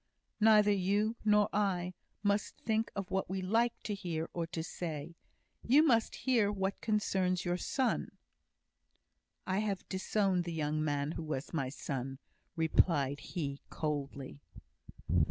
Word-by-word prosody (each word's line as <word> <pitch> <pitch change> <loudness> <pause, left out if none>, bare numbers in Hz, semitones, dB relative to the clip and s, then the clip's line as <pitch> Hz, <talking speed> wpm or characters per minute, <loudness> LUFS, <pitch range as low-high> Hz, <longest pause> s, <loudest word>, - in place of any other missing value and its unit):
"Neither 210 -1 +6
you, 205 +3 +1
nor 210 -1 +5
I, 185 -3 0 0.3
must 205 0 +1
think 220 0 0
of 195 -2 -4
what 190 -2 0
we 190 0 -2
like 230 +5 +2
to 210 - -2
hear 170 -5 -3
or 170 -1 -2
to 165 -1 -4
say. 160 -2 -5 0.5
You 280 +6 +5
must 230 -8 +3
hear 230 -6 +2
what 195 -1 -2
concerns 190 -4 +1
your 175 0 +1
son." 255 +6 0 1.4
"I 190 +1 0
have 205 -3 -2
disowned 190 -1 +1
the 170 - -3
young 155 -1 0
man 145 -1 0
who 165 - -4
was 150 -1 -4
my 135 -5 0
son," 135 -1 -4 0.4
replied 150 -3 +2
he, 140 -5 -4
coldly. 140 -3 -4
185 Hz, 135 wpm, -33 LUFS, 155-210 Hz, 1.4 s, Neither